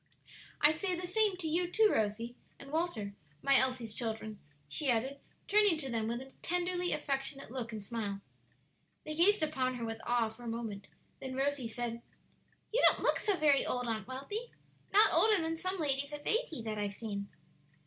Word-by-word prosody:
"I 300 +1 +6
say 365 +3 0
the 360 +1 -4
same 410 +1 +2
to 345 -3 -3
you, 345 +3 +1
too, 430 +3 +5
Rosie 225 +3 -1 0.2
and 275 0 -11
Walter, 310 -12 -1 0.3
my 275 - +5
Elsie's 255 -4 0
children," 220 -2 -3 0.3
she 270 - +1
added, 260 +4 +1 0.3
turning 410 -4 +5
to 270 -4 -4
them 225 -1 0
with 235 +2 -2
a 265 0 -12
tenderly 355 0 0
affectionate 275 -3 -2
look 245 -3 -4
and 215 -2 -5
smile. 205 -2 -3 0.9
They 305 - -4
gazed 350 +3 +4
upon 260 -4 0
her 235 -2 -4
with 225 0 -5
awe 235 -2 +1
for 220 +2 -15
a 240 - -7
moment; 225 -3 -4 0.3
then 260 -1 -5
Rosie 275 -2 0
said, 235 0 -4 0.7
"You - - +3
don't - - +3
look - - +3
so 405 -3 +1
very 295 -4 +4
old, 245 -1 -1
Aunt 220 -3 -2
Wealthy; 340 - -5 0.4
not 420 +2 +6
older 430 -3 +5
than 325 0 -1
some 370 +3 -2
ladies 280 -2 0
of 295 0 -7
eighty 430 - -1
that 215 -1 -3
I've 205 -1 -1
seen." 200 -1 -5
270 Hz, 185 wpm, -33 LUFS, 230-345 Hz, 0.9 s, I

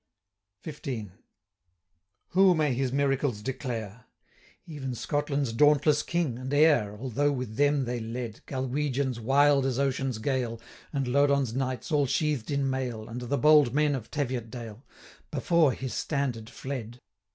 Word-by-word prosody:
285 130 - -5
XV. 110 - -31 1.1
Who 185 0 +5
may 150 -4 +1
his 130 0 -1
miracles 135 -5 0
declare! 115 -4 -5 0.6
Even 135 -6 -5
Scotland's 140 -1 -1
dauntless 150 +3 +4
king, 165 -8 -1
and 130 +1 -5
heir, 145 -9 +3
(Although 135 +4 0
with 125 -5 -4
them 145 -1 +3
they 120 0 -2
led 115 0 -5
Galwegians, 130 -1 -1
wild 140 +4 +4
as 130 -2 -1
ocean's 135 -3 0
gale, 120 -1 -2 0.3
And 135 -3 -1
Lodon's 140 -2 +2
knights, 130 +1 -3
all 145 -2 +3
sheathed 150 -4 0
in 140 -1 0
mail, 130 -4 -2
290 115 +3 -7
And 120 - -8
the 140 - +2
bold 150 -4 +5
men 150 -1 +3
of 125 -5 -5
Teviotdale,) 120 -5 -4 0.5
Before 155 +1 +3
his 130 0 -5
standard 130 -7 -2
fled. 125 -4 -6
135 Hz, 140 wpm, -28 LUFS, 120-145 Hz, 1.1 s, Who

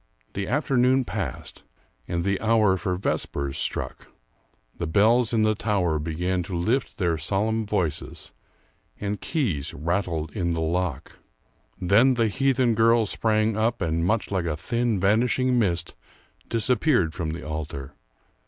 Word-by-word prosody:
The 100 -1 -3
afternoon 130 -2 +2
passed, 95 - -5 0.4
and 85 0 -2
the 100 -1 0
hour 110 -3 +3
for 90 0 -2
vespers 70 -6 -2
struck. - - -3 0.7
The 85 - -2
bells 110 +7 +4
in 110 -2 +2
the 110 0 +3
tower 95 -7 0
began 90 +4 -1
to 90 +1 -4
lift 115 +9 -1
their 85 -6 0
solemn 105 +6 0
voices, 90 -8 -3 0.7
and 105 0 -3
keys 100 - -2
rattled 85 -1 -2
in 85 +2 -1
the - - -2
lock. 80 -3 -2 0.6
Then 110 +8 +4
the 115 -2 +2
heathen 130 0 +2
girl 115 +1 +4
sprang 110 +1 +1
up, 115 +2 0
and, 80 0 0
much 105 +4 0
like 95 -3 0
a 75 -3 -2
thin 115 +4 -1
vanishing 120 +5 +2
mist, 90 -5 0 0.6
disappeared 115 - +2
from 80 -2 -3
the 80 0 -6
altar. 75 -3 -5
100 Hz, 140 wpm, -25 LUFS, 85-115 Hz, 0.7 s, bells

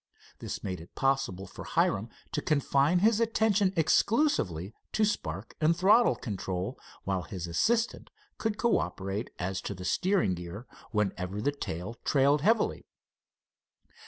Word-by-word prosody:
This - - -5
made 90 -3 -4
it 85 - -15
possible 135 -9 0
for - - -10
Hiram - - +1 0.2
to - - -1
confine 140 +2 +2
his 225 -1 +4
attention 220 -4 +2
exclusively 155 - +2 0.2
to 215 - +3
spark 100 - -3
and 165 +2 +3
throttle 200 - +5
control, 95 -5 -4 0.2
while 95 -2 -1
his 90 -1 -6
assistant 225 - 0 0.3
could 220 -2 -1
cooperate 105 - -1
as 95 +1 -2
to 100 - -5
the 90 0 -8
steering 185 - +2
gear 90 +6 -7 0.2
whenever 100 -2 -1
the 140 +7 +1
tail 115 - -6
trailed 140 +1 +3
heavily. 225 +7 +1
130 Hz, 130 wpm, -29 LUFS, -, 0.3 s, throttle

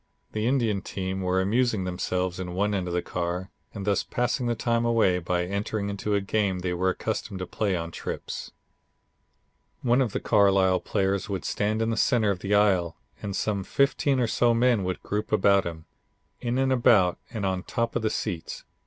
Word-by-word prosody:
The 110 +1 -1
Indian 115 -7 +1
team 95 0 -4
were 90 0 +1
amusing 110 +1 +1
themselves 90 0 -2
in 90 -1 -5
one 105 +2 +1
end 95 -3 -1
of 85 - -3
the 90 - 0
car, 90 +2 -3 0.2
and 100 -2 -6
thus 100 -1 +2
passing 125 +1 -1
the 120 - +1
time 115 +1 0
away 115 -6 +3
by 90 0 -1
entering 100 +2 -2
into 100 +1 -1
a 100 - +1
game 100 -1 0
they 90 0 -1
were 95 +1 +1
accustomed 105 0 -3
to 90 - -4
play 100 0 -1
on 85 -1 -4
trips. - - -5 1.3
One 125 +2 +3
of 120 -5 0
the - - -2
Carlisle 95 -3 +4
players 100 -1 -1
would 95 -5 -3
stand 110 +4 0
in 115 - 0
the 110 - -2
center 110 -3 +3
of 95 - -3
the 100 +3 0
aisle 95 -5 +2 0.2
and 100 -1 -4
some 100 -2 -1
fifteen 140 +3 +1
or 125 - +3
so 120 +1 +2
men 120 -3 +3
would 90 0 -3
group 105 +1 -3
about 100 -2 +4
him, 80 -1 -7 0.5
in 120 +1 -1
and 130 0 +2
about 100 -8 +4
and 110 -4 -4
on 95 -1 0
top 115 +4 -2
of 120 - +1
the 110 - +1
seats. 90 -6 -4
100 Hz, 195 wpm, -26 LUFS, 95-115 Hz, 1.3 s, Carlisle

